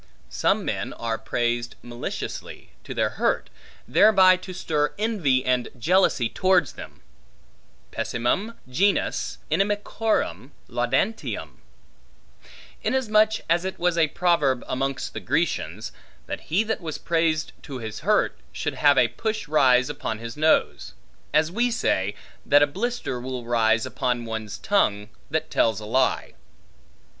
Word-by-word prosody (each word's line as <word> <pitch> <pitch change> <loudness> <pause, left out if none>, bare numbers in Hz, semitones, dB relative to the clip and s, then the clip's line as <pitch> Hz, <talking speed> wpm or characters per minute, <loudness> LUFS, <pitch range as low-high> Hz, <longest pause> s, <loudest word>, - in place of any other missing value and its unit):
Some - - +1
men - - -3
are 115 -1 -3
praised 120 0 -1
maliciously, 120 0 -6
to - - -6
their - - +1
hurt, - - +1 0.4
thereby 190 -3 +6
to 185 +1 -9
stir 150 -4 -1
envy 175 - +1
and 125 -1 +1
jealousy 165 -3 +3
towards 180 +2 +2
them: - - -11 0.9
pessimum 190 - -1
genus 190 +11 0
inimicorum 205 - 0 0.2
laudantium; 130 - -2 1.2
insomuch 220 -4 +2
as 170 +1 +2
it 190 0 -4
was 175 -1 +1
a 165 -2 +3
proverb, 150 -7 +1
amongst 135 +1 -2
the - - -4
Grecians, - - -1 0.3
that - - -5
he 185 +7 +3
that 220 -2 -2
was 160 -3 -4
praised 165 -2 0
to 135 - -7
his 110 -3 -6
hurt, 210 +6 +2 0.2
should - - -3
have - - +6
a - - +5
push 220 -4 -3
rise 130 -4 +4
upon 145 -6 -4
his 115 +1 -7
nose; 155 - +1 0.4
as 155 +2 +2
we 240 +5 +1
say, 105 - 0 0.3
that 145 +1 +5
a - - +6
blister 200 - -3
will 125 -1 -5
rise 115 -1 +2
upon 120 -2 -2
one's 110 -2 -5
tongue, 105 - +1 0.2
that 160 +1 -2
tells 110 -3 +2
a 105 - -8
lie. 130 +4 +1
150 Hz, 130 wpm, -24 LUFS, 120-190 Hz, 1.2 s, thereby